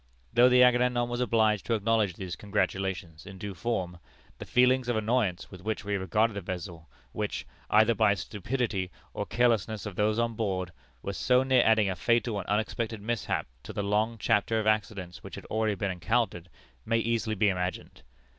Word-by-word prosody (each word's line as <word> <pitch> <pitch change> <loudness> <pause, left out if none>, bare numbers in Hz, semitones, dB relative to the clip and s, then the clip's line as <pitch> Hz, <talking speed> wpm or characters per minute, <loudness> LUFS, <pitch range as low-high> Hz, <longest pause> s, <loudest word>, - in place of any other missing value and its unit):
Though 125 +1 +6
the 125 0 +6
Agamemnon 125 -1 +3
was 120 +1 -2
obliged 110 -4 +2
to 115 - +2
acknowledge 110 -3 +1
these 90 -3 -5
congratulations 95 -5 -2
in 95 -1 -9
due 100 +1 -6
form, 90 -2 -3 0.4
the - - -8
feelings 125 0 +3
of 120 - +1
annoyance 110 -4 0
with 95 -2 -10
which 110 +1 -3
we 100 0 -1
regarded 105 +4 +1
the 100 - -4
vessel 85 -3 -7 0.2
which, - - -3 0.2
either 110 +2 +5
by 100 -1 +3
the - - -7
stupidity 105 -3 -2 0.2
or - - -4
carelessness 110 -3 +1
of 105 -3 -6
those 105 +2 +1
on 115 0 0
board, 95 -5 -2 0.3
was 100 - -4
so 125 +1 +3
near 130 -2 +4
adding 110 -2 +4
a 95 - -1
fatal 115 +2 +1
and 95 - -7
unexpected 110 +1 -1
mishap 115 +3 -2 0.2
to 75 - -9
the 100 - -2
long 105 +3 0
chapter 110 +1 +1
of 110 - -2
accidents 100 -5 -1
which - - -9
had - - -9
already 110 -1 +1
been 100 -1 -2
encountered, 90 0 -1 0.3
may 115 0 +1
easily 115 -1 0
be 105 +1 +3
imagined. 90 -6 -4
105 Hz, 185 wpm, -28 LUFS, 95-115 Hz, 0.4 s, Though